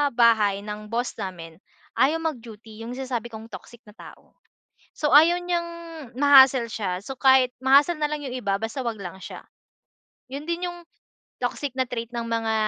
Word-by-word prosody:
bahay 215 -4 +4
ng 210 0 -7
boss 240 +2 -1
namin, 170 -4 -7 0.4
ayaw 310 +5 +3
mag-duty 225 -7 -7
yung 245 +2 -6
sinasabi 255 -3 -4
kong 220 +1 -10
toxic 240 -1 -11
na - - -13
tao. - - -15 0.6
So, 300 - 0
ayaw 335 +4 +7
niyang 345 -1 -1 0.5
ma-hassle 270 -4 +6
siya 185 -5 -3
so 270 - -6
kahit 260 -2 +4
ma-hassle 285 +5 +4
nalang 300 0 -1
yung 255 - -5
iba, 200 -5 -1
basta 225 +5 -4
'wag 225 -3 -3
lang 190 -1 -8
siya. - - -9 0.9
Yun 285 +2 -5
din 350 +1 -2
yung 350 - -11 0.6
toxic 285 -3 -3
na 260 - +1
trait 230 -2 -4
ng 235 -1 -3
mga 225 -1 -1
240 Hz, 165 wpm, -24 LUFS, 220-280 Hz, 0.9 s, ayaw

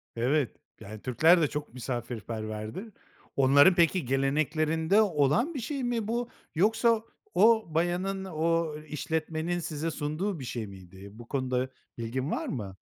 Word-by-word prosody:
Evet. 130 +2 +1 0.3
Yani, 105 +1 -9
Türkler 160 +7 +4
de 150 - +3
çok 150 -4 -5
misafirperverdir. 115 - -5 0.4
Onların 140 +6 +6
peki, 170 -3 +3
geleneklerinde 155 - +2
olan 200 - +2
bir 275 - -3
şey 265 +3 -3
mi 235 -3 -1
bu? 240 +1 -1 0.3
Yoksa 225 +4 +3 0.3
o 220 +4 +5
bayanın, 180 +3 0
o 165 -2 0
işletmenin 160 +3 -2
size 160 0 -3
sunduğu 155 +5 -2
bir 130 - -6
şey 115 -3 -4
miydi? 95 +1 -12
Bu 115 +2 -12
konuda 130 -1 -1 0.3
bilgin 130 +5 -3
var - - -2
mı? 100 -7 -5
155 Hz, 135 wpm, -29 LUFS, 125-185 Hz, 0.4 s, Onların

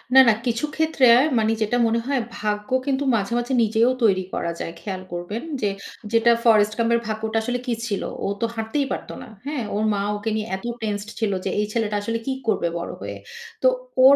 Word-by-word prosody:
না, - - +11
না, - - +6
কিছু 235 +4 0
ক্ষেত্রে 315 -4 +3 0.3
মানে 220 0 +2
যেটা 215 +3 +1
মনে 230 +1 +1
হয় 275 -3 +1 0.2
ভাগ্য 210 0 -2 0.2
কিন্তু 275 0 0
মাঝে, 205 +2 -1
মাঝে 240 +2 -1
নিজেও 225 +3 +3
তৈরি 190 -4 +4
করা 170 - -1
যায়। 165 - -4
খেয়াল 190 -3 -4
করবেন 175 +6 -4 0.2
যে 205 - +2 0.4
যেটা 230 +1 +5
Forest 215 -2 +5
Gump 230 0 +1
এর 235 - +4
ভাগ্যটা 220 0 -2
আসলে 245 +2 -1
কি 245 - 0
ছিল? 200 -3 -1 0.2
ও - - 0
তো - - +3
হাঁটতেই 225 +6 -1
পারত - - -4
না, - - -9 0.2
হ্যাঁ? 285 -4 -2
ওর 210 - 0
মা 200 - 0
ওকে 205 +2 -3
নিয়ে 215 0 -2
এত 190 - -9 0.2
টেন্সড 210 -1 -3
ছিল 220 -3 +1
যে - - +1
এই 210 - +2
ছেলেটা 220 -3 0
আসলে 230 +3 -1
কি 270 - -1 0.2
করবে 200 -5 +2
বড় 170 - -4
হয়ে? - - -5 0.5
তো - - +7 0.4
ওর 275 +1 +9
220 Hz, 210 wpm, -23 LUFS, 210-240 Hz, 0.5 s, না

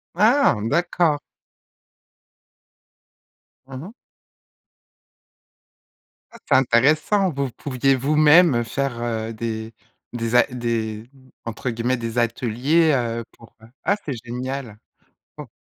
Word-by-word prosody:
Ah! 235 +10 +4
D'accord. 170 -1 +1 2.5
Mmh 135 - -10
mh. 195 +7 -10 2.4
Ah, - - -13
c'est - - +3
intéressant, 150 - +3
vous 140 -2 -2
pouviez 135 +1 0
vous-même, 150 +3 +5
heu, 120 - 0
faire, 130 0 -3
heu, 115 -1 -3
des 110 0 -5 0.4
des 115 0 -2
a 120 - +7
des 115 -3 -3 0.4
entre 115 +3 -4
guillemets 120 +2 -1
«des 115 0 -5
ateliers», 125 +7 +1
heu, 115 -2 -2
pour, 115 - -18
heu, 110 - -15 0.2
ah, 200 - +2
c'est 140 - -3
génial! 125 -2 -5 0.6
O - - -8
125 Hz, 110 wpm, -22 LUFS, 115-150 Hz, 2.5 s, a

